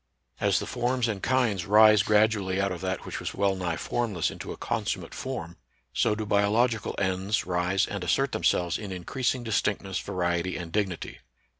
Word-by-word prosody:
As - - +2
the - - -2
forms 125 0 0
and 105 -4 -3
kinds 120 -9 +1
rise 105 0 +7
gradually 105 -2 +2
out 100 0 +1
of 90 - -5
that 95 -1 -3
which - - -5
was - - -5
well 100 -1 +2
nigh 90 -3 -2
form 120 -1 -2
less 85 - 0
into - - -7
a - - -7
consummate - - -3
form, 85 +2 -5 0.4
so 105 - +2
do 110 0 -3
biological 105 +3 +1
ends 95 +2 0
rise 90 +1 +1
and 100 -2 -5
assert 135 - +1
themselves 90 -1 +1
in 105 -3 -6
increasing 120 +8 -2
distinctness, 105 -3 -1
variety, 90 0 -1
and 85 -2 -7
dignity. 95 -3 -2
100 Hz, 175 wpm, -27 LUFS, 90-110 Hz, 0.4 s, rise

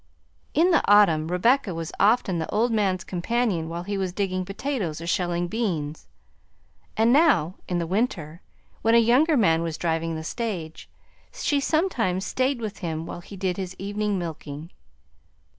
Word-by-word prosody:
In 345 +4 +4
the 340 - +4
autumn 170 -7 +5
Rebecca 190 +3 +2
was 165 -1 -5
often 200 -4 +3
the 160 - -3
old 230 +3 +1
man's 195 -4 +1
companion 185 -2 -1
while 170 +1 -4
he 200 +1 -3
was 190 -2 -1
digging 185 -1 -2
potatoes 195 - -3
or 165 - -7
shelling 175 0 0
beans, 170 -8 -3 0.9
and 225 +2 +4
now 275 - +4
in 180 - -1
the 170 - -1
winter, 175 - -2 0.4
when 225 +1 +3
a - - +8
younger 260 +7 +4
man 165 -8 +3
was 165 -2 -3
driving 165 -1 -1
the 160 - -5
stage, 175 -5 -5 0.4
she 345 -12 0
sometimes 255 - 0
stayed 260 -1 0
with 215 -3 -5
him 165 -2 -3
while 175 - -7
he 195 +3 -11
did 185 -2 -1
his 185 -1 -5
evening 205 +1 -2
milking. 160 -2 -6
190 Hz, 160 wpm, -25 LUFS, 165-230 Hz, 0.9 s, a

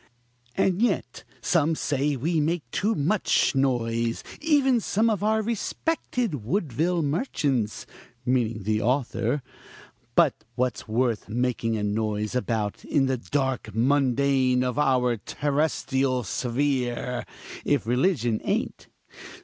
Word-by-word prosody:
"And 190 +1 +1
yet 240 - 0 0.2
some 160 -2 +2
say 145 -1 0
we 160 +6 0
make 160 +1 0
too 215 +3 +1
much 170 +8 +2
noise 115 -4 0 0.2
even 280 -5 +3
some 225 +1 +1
of 205 - -1
our 220 +1 +2
respected 235 - -2
Woodville 165 - 0
merchants 140 - -1 0.4
(meaning 115 -4 0
the 110 +2 0
author). 125 +1 0 0.7
But - - +3
what's 125 -1 -1
worth 115 -1 0
making 115 -1 0
a 105 - -2
noise 105 +1 -1
about 115 -5 -2
in 140 -3 +2
the 130 -1 0
dark 130 -4 -2
mundane 130 0 +2
of 125 +2 -1
our 125 -4 +2
terrestrial 135 0 0
sphere, 125 +1 -1 0.4
if - - +1
religion 120 - +1
ain't? - - -2
130 Hz, 115 wpm, -26 LUFS, 120-160 Hz, 0.7 s, even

